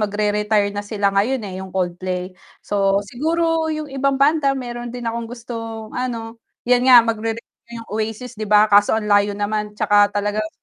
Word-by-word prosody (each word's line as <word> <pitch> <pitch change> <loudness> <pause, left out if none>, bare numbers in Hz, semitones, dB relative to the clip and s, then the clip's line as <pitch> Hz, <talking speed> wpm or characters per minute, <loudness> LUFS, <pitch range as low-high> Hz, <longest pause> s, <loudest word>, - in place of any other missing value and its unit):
mag-re 210 0 0
retire 210 -1 +1
na 205 - -3
sila 205 -1 -1
ngayon 220 +5 0
eh 190 -1 -6
yung 190 - -7
Coldplay. 185 0 -3 0.3
So, 200 0 +1
siguro 320 +7 0
'yung 310 -1 -3
ibang 275 0 0
banda 280 0 +2
meron 240 -1 -6
din 245 0 -7
akong 230 0 -3
gustong 225 -2 -7
ano, 230 -2 -5 0.2
'yan 250 +1 +3
nga 245 -2 +9
mag-re-re 225 0 -2 0.4
yung 230 - -8
Oasis 220 +3 -4
'di 215 -3 -6
ba? 210 0 +6
Kaso 205 0 +4
ang 220 - -2
layo 205 -1 +2
naman 210 0 -3
tsaka 205 -1 +4
talagang 210 +1 -2
220 Hz, 175 wpm, -20 LUFS, 205-245 Hz, 0.4 s, nga